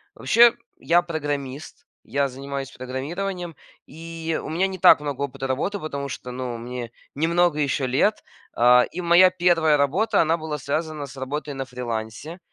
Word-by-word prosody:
Вообще, 235 Hz, 0 st, +5 dB, 0.3 s
я- 175 Hz, +1 st, +3 dB
программист. 145 Hz, -, -5 dB, 0.2 s
Я 140 Hz, +4 st, 0 dB
занимаюсь 135 Hz, +1 st, -6 dB
программированием, 170 Hz, +7 st, -5 dB, 0.3 s
и 165 Hz, +1 st, -5 dB
у -, -, -6 dB
меня 175 Hz, +5 st, +1 dB
не 190 Hz, -, -6 dB
так 180 Hz, -3 st, +7 dB
много 145 Hz, -2 st, -5 dB
опыта 135 Hz, -1 st, -4 dB
работы, 165 Hz, +10 st, -2 dB
потому 140 Hz, -4 st, -5 dB
что, 125 Hz, -1 st, -7 dB
ну, 125 Hz, -1 st, -4 dB
мне 120 Hz, 0 st, -6 dB, 0.2 s
немного 170 Hz, +2 st, +2 dB
еще 140 Hz, -2 st, 0 dB
лет. 145 Hz, +12 st, +1 dB, 0.3 s
А, 125 Hz, +1 st, +6 dB
и -, -, -3 dB
моя 175 Hz, +2 st, +6 dB
первая 170 Hz, -4 st, +3 dB
работа, 185 Hz, +10 st, +2 dB
она 165 Hz, +1 st, +2 dB
была 155 Hz, -2 st, -4 dB
связана 150 Hz, +2 st, -3 dB
с 135 Hz, -, -12 dB
работой 140 Hz, +2 st, -4 dB
на 135 Hz, -, -4 dB
фрилансе. 125 Hz, -, -6 dB
150 Hz, 160 wpm, -23 LUFS, 130-170 Hz, 0.3 s, так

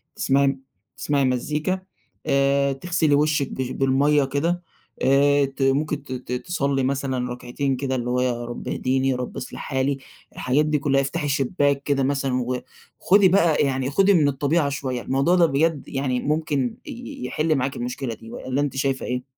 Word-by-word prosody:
تسمعي 140 Hz, +1 st, +2 dB
م 135 Hz, -1 st, -1 dB, 0.4 s
تسمعي 140 Hz, +1 st, +1 dB
مزيكا 150 Hz, +8 st, -1 dB, 0.5 s
آآ، 140 Hz, 0 st, +2 dB
تغسلي 160 Hz, 0 st, +1 dB
وِشّك 150 Hz, -1 st, +1 dB
بش 130 Hz, -1 st, -3 dB
بالمَيَّة 140 Hz, +2 st, +2 dB
كده 165 Hz, +6 st, -1 dB, 0.4 s
آآ، 140 Hz, +1 st, +4 dB
ت 135 Hz, 0 st, -8 dB
ممكن 140 Hz, +2 st, +1 dB
ت 135 Hz, -, -12 dB
ت 125 Hz, -1 st, -7 dB
تصلّي 140 Hz, 0 st, -1 dB
مثلًا 130 Hz, -2 st, -1 dB
ركعتين 125 Hz, +3 st, -2 dB
كده 130 Hz, 0 st, -2 dB
اللي 120 Hz, -1 st, -2 dB
هو 125 Hz, 0 st, +1 dB
يا 120 Hz, -1 st, -1 dB
رب 120 Hz, -, -7 dB
اهديني، 130 Hz, +1 st, 0 dB
يا 130 Hz, -, +1 dB
رب 125 Hz, 0 st, -5 dB
اصلح 125 Hz, -, -7 dB
حالي، 135 Hz, 0 st, -1 dB, 0.4 s
الحاجات 135 Hz, +4 st, +1 dB
دي 150 Hz, -1 st, +1 dB
كلّها 135 Hz, -1 st, +2 dB
افتحي 140 Hz, +2 st, -2 dB
شبّاك 140 Hz, 0 st, +1 dB
كده 140 Hz, -2 st, +1 dB
مثلًا، 135 Hz, -2 st, 0 dB, 0.6 s
وخدي 200 Hz, +1 st, +5 dB
بقى 170 Hz, -4 st, +4 dB
يعني 135 Hz, -1 st, 0 dB
خدي 195 Hz, +7 st, +4 dB
من 155 Hz, -6 st, +4 dB
الطبيعة 145 Hz, +2 st, +1 dB
شويّة، 130 Hz, -3 st, -3 dB
الموضوع 140 Hz, +9 st, +2 dB
ده 175 Hz, -2 st, +5 dB
بجد 155 Hz, 0 st, 0 dB
يعني 135 Hz, -2 st, -1 dB
ممكن 145 Hz, -3 st, -1 dB
ي 245 Hz, -, -7 dB
يحل 155 Hz, +4 st, 0 dB
معاكِ 135 Hz, 0 st, -1 dB
المشكلة 125 Hz, 0 st, -4 dB
دي 115 Hz, +1 st, -12 dB
والَّا 130 Hz, +2 st, -2 dB
أنتِ 145 Hz, -2 st, -2 dB
شايفة 135 Hz, -1 st, 0 dB
إيه؟ 125 Hz, 0 st, -2 dB
140 Hz, 175 wpm, -23 LUFS, 130-150 Hz, 0.6 s, وخدي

